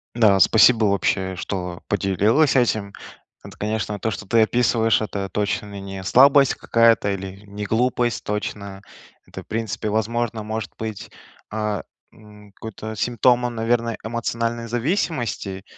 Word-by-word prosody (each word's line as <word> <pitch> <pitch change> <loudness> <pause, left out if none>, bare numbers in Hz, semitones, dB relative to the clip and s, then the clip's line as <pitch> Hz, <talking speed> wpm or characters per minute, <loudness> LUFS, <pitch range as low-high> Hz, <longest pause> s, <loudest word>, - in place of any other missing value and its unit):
Да, 105 -5 +4
спасибо, 110 +4 +5
вообще, 95 -1 0
что 90 -1 -5
поделилась 100 - +2
этим. 110 -5 +1 0.5
Это, - - -12
конечно, 105 0 -3
то, 110 - -1
что 95 +2 -7
ты 115 +2 +3
описываешь, 115 -1 +2
это 100 -2 -3
точно 100 0 -3
не 95 -1 -7
слабость 135 +5 +5
какая-то 115 -3 +3
или 95 +1 -6
не 105 +1 -6
глупость 120 +2 0
точно. 100 -1 -5 0.4
Это - - -9
в - - -20
принципе, 110 -1 -3
возможно, 110 +1 -1
может 110 -1 -4
быть, 110 -2 -6 0.4
э, 105 -2 -2 0.3
м, 105 -1 -17
какой-то 110 +1 -8
симптом 120 +2 +2
он, 120 -1 -3
наверное, 115 0 0
эмоциональной 115 0 -2
зависимости. 120 - -2
110 Hz, 135 wpm, -22 LUFS, 100-115 Hz, 0.5 s, спасибо